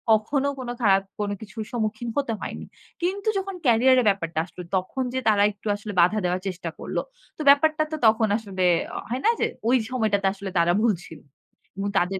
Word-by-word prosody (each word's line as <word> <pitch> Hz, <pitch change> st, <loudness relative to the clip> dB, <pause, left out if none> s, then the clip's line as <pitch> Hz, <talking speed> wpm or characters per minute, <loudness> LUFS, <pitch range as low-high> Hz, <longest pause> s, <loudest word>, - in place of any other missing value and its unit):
কখনো 265 Hz, +6 st, 0 dB
কোনো 245 Hz, -2 st, -4 dB
খারাপ 195 Hz, -3 st, +4 dB, 0.2 s
কোনো 205 Hz, -1 st, -1 dB
কিছুর 215 Hz, +1 st, -6 dB
সম্মুখীন 225 Hz, 0 st, -2 dB
হতে 275 Hz, -5 st, 0 dB
হয়নি। -, -, -6 dB, 0.4 s
কিন্তু 390 Hz, +4 st, -2 dB
যখন 390 Hz, 0 st, -3 dB
ক্যারিয়ার 255 Hz, +2 st, +5 dB
এ -, -, -2 dB
ব্যাপারটা 165 Hz, -5 st, -1 dB
আসলো 180 Hz, -, -11 dB
তখন 190 Hz, +8 st, -1 dB
যে 260 Hz, -, 0 dB
তারা 205 Hz, -2 st, +4 dB
একটু 205 Hz, +1 st, -11 dB
আসলে 205 Hz, 0 st, -7 dB
বাধা 180 Hz, +5 st, +3 dB
দেওয়ার 180 Hz, +1 st, 0 dB
চেষ্টা 180 Hz, -2 st, -4 dB
করল। -, -, -5 dB, 0.4 s
তো -, -, -5 dB
ব্যাপারটা 310 Hz, +2 st, +5 dB
তো 310 Hz, -, -1 dB
তখন 220 Hz, 0 st, +4 dB
আসলে 195 Hz, -4 st, -4 dB, 0.5 s
হয় 250 Hz, +3 st, -2 dB
না -, -, +6 dB
যে -, -, +2 dB, 0.2 s
ওই 255 Hz, -, +5 dB
সময়টাতে 215 Hz, -6 st, +1 dB
আসলে 200 Hz, -1 st, -7 dB
তারা 170 Hz, 0 st, +4 dB
ভুল 230 Hz, -2 st, +3 dB
ছিল। 160 Hz, -, -11 dB, 0.6 s
এবং 200 Hz, +1 st, -2 dB
তাদের 190 Hz, +2 st, +1 dB
215 Hz, 190 wpm, -24 LUFS, 195-255 Hz, 0.6 s, না